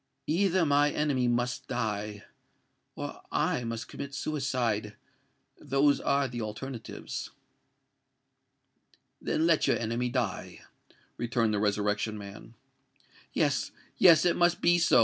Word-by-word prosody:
Either 185 +2 +2
my 145 0 +4
enemy 140 -4 0
must 120 +1 -1
die—or 105 -3 -6
I 125 - 0
must 115 -1 -4
commit 140 0 -7
suicide! 120 -9 -1 0.6
Those 140 +2 +2
are 140 0 +2
the 120 -1 -5
alternatives." 110 +3 -6 1.9
"Then 160 - 0
let 165 -2 +3
your - - +3
enemy 120 +2 -1
die," 120 -3 -3 0.6
returned 115 -2 0
the 105 - +1
Resurrection 105 +1 0
Man. 105 +3 -10 0.8
"Yes—yes: 165 -3 +3
it 175 - +3
must 175 0 +3
be 175 0 +4
so!" 170 -7 +5
125 Hz, 110 wpm, -29 LUFS, 110-145 Hz, 1.9 s, so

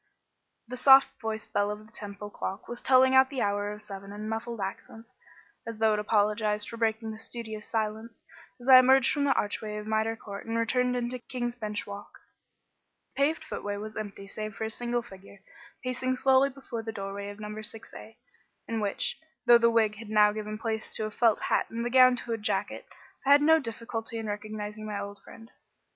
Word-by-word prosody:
The 250 +2 -6
soft 270 +1 +7
voiced 220 -1 -4
bell 205 0 +2
of 210 +1 -6
the 220 - -20
Temple 205 0 -8
clock 195 0 -5
was 240 0 -6
telling 260 0 +5
out 265 0 +6
the 270 -2 -2
hour 205 0 -1
of 210 +1 -8
seven 195 -1 -8
in 210 +1 -6
muffled 225 +1 -4
accents 225 +4 -7 0.5
(as 230 -1 -5
though 220 0 +3
it 210 - 0
apologised 210 0 +1
for 230 - -7
breaking 225 0 0
the 215 - -8
studious 220 -2 -6
silence) 220 +1 -3 0.4
as 245 - -11
I 260 -1 +10
emerged 265 +1 +5
from 285 -1 0
the 275 - +4
archway 210 +1 -2
of 210 - -6
Mitre 220 +1 0
Court 200 -1 -9
and 230 0 0
turned 250 0 +1
into 245 +1 -2
King's 240 -1 -4
Bench 210 -3 -4
Walk. 205 0 -9 1.0
The - - -7
paved 310 +3 +2
footway 205 0 -4
was 215 +1 -7
empty 200 -2 -6
save 215 +1 -6
for - - -5
a 220 - -1
single 240 +1 -1
figure, 200 -2 -14 0.5
pacing 255 0 -1
slowly 265 +1 +4
before 265 -4 -7
the 225 0 -5
doorway 200 -1 -5
of 205 +1 -10
number 210 0 -6
6A, 220 0 -7 0.5
in 225 -1 -2
which, 205 -2 -1 0.3
though 240 -1 +8
the 235 0 +5
wig 220 -2 +2
had 220 0 -10
now 210 -1 +5
given 215 0 -5
place 220 -1 -3
to 215 - -1
a 215 - -4
felt 225 0 +2
hat - - +1
and 230 +1 -4
the 240 - -2
gown 255 0 +7
to 235 -1 -4
a 225 - -3
jacket, 210 - -2 0.4
I 280 - +2
had 290 +1 +6
no 320 +1 +6
difficulty 230 -3 -5
in 225 - -4
recognising 210 0 -5
my 205 -1 -3 0.2
friend. 225 +1 -14
220 Hz, 200 wpm, -28 LUFS, 210-240 Hz, 1.0 s, I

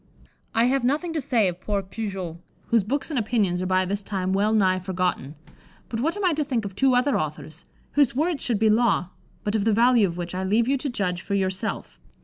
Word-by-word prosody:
I 225 - +4
have 260 +1 +2
nothing 305 +7 0
to 315 - -1
say 240 -7 +2
of 180 0 -4
poor 200 -1 -1
Pujoulx, 190 -4 -5 0.3
whose 230 -3 +3
books 280 - -2
and 275 - 0
opinions 205 -5 0
are 185 - -2
by 185 0 +2
this 200 +2 -2
time 190 -2 -2
well 205 +2 +2
nigh 190 -4 +3
forgotten; 180 -6 -2 0.5
but 225 - -3
what 325 - -1
am 410 - -1
I 355 - +3
to 305 0 0
think 250 -7 -2
of 195 -2 -6
two 260 +4 +3
other 255 +2 +2
authors, 155 +1 -6 0.3
whose 285 -4 +2
words 315 +2 0
should 235 -4 +1
be 215 +1 +3
law, 210 -6 +2 0.3
but 205 - -1
of 215 -2 +1
the 220 0 +2
value 235 -1 +4
of 170 -1 -6
which 175 0 -4
I 185 +1 -2
leave 215 +5 +2
you 275 - +2
to 275 +1 -2
judge 180 -7 -1
for 200 - -3
yourself. 190 +3 -2
210 Hz, 230 wpm, -24 LUFS, 185-250 Hz, 0.5 s, I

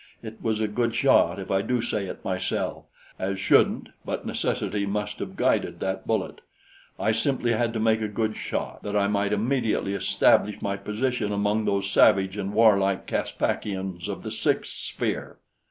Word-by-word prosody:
It 110 0 -9
was 110 -1 0
a 110 - +1
good 115 +2 -1
shot - - +4
if - - -6
I 95 0 +3
do 125 +4 0
say 105 -4 -2
it - - -8
myself, 95 -1 -2 0.3
"as 95 0 -2
shouldn't" 100 - +3
but - - -4
necessity 105 -1 -1
must 105 +1 -3
have - - -5
guided - - +1
that 95 0 -3
bullet; 110 - -1 0.6
I 110 - +2
simply 120 +1 +1
had 115 0 +1
to 115 - -2
make 110 0 +2
a 110 - 0
good 110 +1 -2
shot, - - -4
that 105 0 -4
I 100 -1 +3
might 100 0 0
immediately 110 -2 0
establish 105 +1 +3
my 100 0 -2
position 105 +2 -2
among 105 +1 +1
those 100 0 0
savage 95 -1 +4
and 100 -1 -3
warlike 100 -3 +4
Caspakians 95 -3 -2
of - - -5
the - - -5
sixth - - 0
sphere. - - -4
105 Hz, 170 wpm, -26 LUFS, 100-110 Hz, 0.6 s, shot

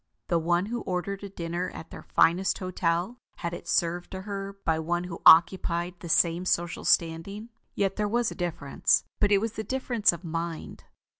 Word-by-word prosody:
The 170 - +3
one 175 +3 +1
who 235 +2 -4
ordered 190 +2 -3
a 200 - -6
dinner 175 0 -4
at - - -9
their - - -9
finest 180 +3 +2
hotel, 185 +4 -1 0.2
had 170 -2 -4
it 175 - -8
served 175 +1 0
to 190 0 -7
her 200 -1 -6
by 160 0 +1
one 175 +2 -1
who 175 -2 -7
occupied 170 +1 +5
the 170 - -8
same 170 +1 +3
social 175 -1 -1
standing. 175 +7 0 0.3
Yet 195 -1 0
there 210 -1 0
was 235 +2 0
a - - -7
difference; 170 -6 0 0.2
but 205 -1 +2
it 200 - +6
was 225 +3 -1
the 220 - -4
difference 240 -2 +1
of 170 0 -8
mind. 165 -1 -5
180 Hz, 190 wpm, -27 LUFS, 170-200 Hz, 0.3 s, it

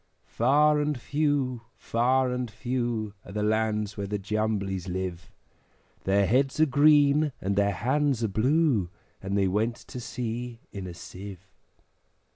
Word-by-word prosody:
Far 150 +5 +3
and 150 -3 -1
few, 140 -3 0 0.2
far 125 +2 +1
and 125 -1 -2
few, 120 -2 -2
Are - - -11
the 105 +1 -2
lands 105 -1 0
where 100 -1 -3
the 105 +1 -2
Jumblies 100 -2 -2
live; 90 -5 -4 0.8
Their 100 +1 +3
heads 135 +8 +1
are 155 - +6
green, 145 0 +4
and 100 +1 -1
their 100 0 +2
hands 130 +4 0
are - - +2
blue, 120 - +2 0.3
And 100 +1 -2
they 100 -1 +3
went 110 +5 0
to 125 - -9
sea 120 -1 -5
in 100 -2 -6
a 85 - -8
Sieve. 95 +1 -10
115 Hz, 145 wpm, -27 LUFS, 100-130 Hz, 0.8 s, are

